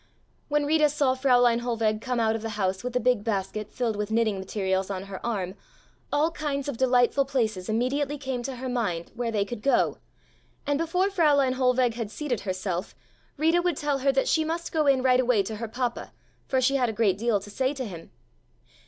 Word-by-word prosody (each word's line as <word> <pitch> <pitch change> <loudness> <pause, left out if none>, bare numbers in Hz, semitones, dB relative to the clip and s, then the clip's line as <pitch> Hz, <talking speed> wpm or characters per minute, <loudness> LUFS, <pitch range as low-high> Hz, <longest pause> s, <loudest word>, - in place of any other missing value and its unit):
When 295 0 +1
Rita 305 0 +4
saw 285 -3 +2
Fräulein 245 -3 +3
Hohlweg 225 -3 -1
come 250 -1 -2
out 220 -1 +2
of 225 - -4
the 220 -1 -5
house 190 0 -1
with 250 0 -4
a - - +3
big 250 -3 +2
basket 210 -1 -3
filled 235 -4 -1
with 210 0 -3
knitting 220 -3 +1
materials 190 0 -1
on 190 -1 -3
her 195 -1 -8
arm 195 -6 -2 0.6
all 310 +3 +2
kinds 285 -4 -3
of 285 - -2
delightful 250 +2 +3
places 220 -9 -1
immediately 270 +6 0
came 265 -3 -3
to 265 +2 -5
her 255 +1 -5
mind, 205 -10 -2
where 240 0 -2
they 205 -2 0
could 240 -1 -7
go, 275 - +2 0.7
and 285 0 0
before 360 +4 +1
Fräulein 290 -8 +3
Hohlweg 250 -2 +2
had 230 -3 -4
seated 250 -1 -3
herself 185 -1 -3 0.4
Rita 325 +4 +3
would 355 0 0
tell 290 -2 0
her 275 +1 +3
that 270 0 +1
she 320 - +3
must 330 +2 -3
go 310 -2 +1
in 265 -2 +4
right 255 -1 +4
away 245 -5 +3
to 215 +2 -5
her 230 +1 -4
papa, 240 +1 -3 0.4
for 260 - +1
she 270 +2 +2
had 250 -3 +1
a - - -3
great 205 -3 +1
deal 230 -2 +2
to 205 +2 -11
say 260 +5 0
to 260 -2 -4
him. 170 -6 -9
245 Hz, 210 wpm, -26 LUFS, 215-275 Hz, 0.7 s, Rita